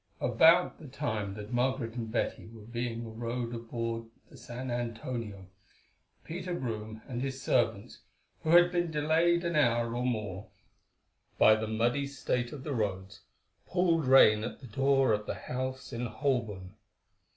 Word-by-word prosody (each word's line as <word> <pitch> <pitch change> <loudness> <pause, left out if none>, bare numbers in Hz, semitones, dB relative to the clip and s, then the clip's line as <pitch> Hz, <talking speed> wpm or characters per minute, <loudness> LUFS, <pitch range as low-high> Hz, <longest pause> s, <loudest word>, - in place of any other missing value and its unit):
About 160 +9 +4
the 155 - -10
time 110 -8 -3
that 105 +3 -8
Margaret 125 -1 0
and 115 -2 -5
Betty 115 - -2
were 110 -1 -12
being 115 -1 -4
rowed 120 0 -3
aboard 115 0 -4 0.3
the - - -14
San 125 +1 -6
Antonio, 115 -4 -4 0.8
Peter 180 +2 -4
Brome 110 -5 -5
and 125 -3 -4
his 135 0 -3
servants, - - 0 0.4
who 155 - -3
had 175 +1 +7
been 175 -1 0
delayed 160 +3 +2
an 170 -1 -1
hour 120 -4 +2
or 120 - -1
more 105 -5 -3 0.9
by 110 - +7
the 110 0 -1
muddy 120 +6 0
state 125 -3 -2
of 140 -3 -8
the 145 - -3
roads, 100 -3 -3 0.5
pulled 170 -4 +2
rein 110 -5 +7
at 115 - -5
the 135 - -11
door 135 +1 +2
of 105 0 -2
the - - -2
house 130 0 -5
in 120 +1 -2
Holborn. 110 -6 -2
120 Hz, 150 wpm, -30 LUFS, 110-140 Hz, 0.9 s, had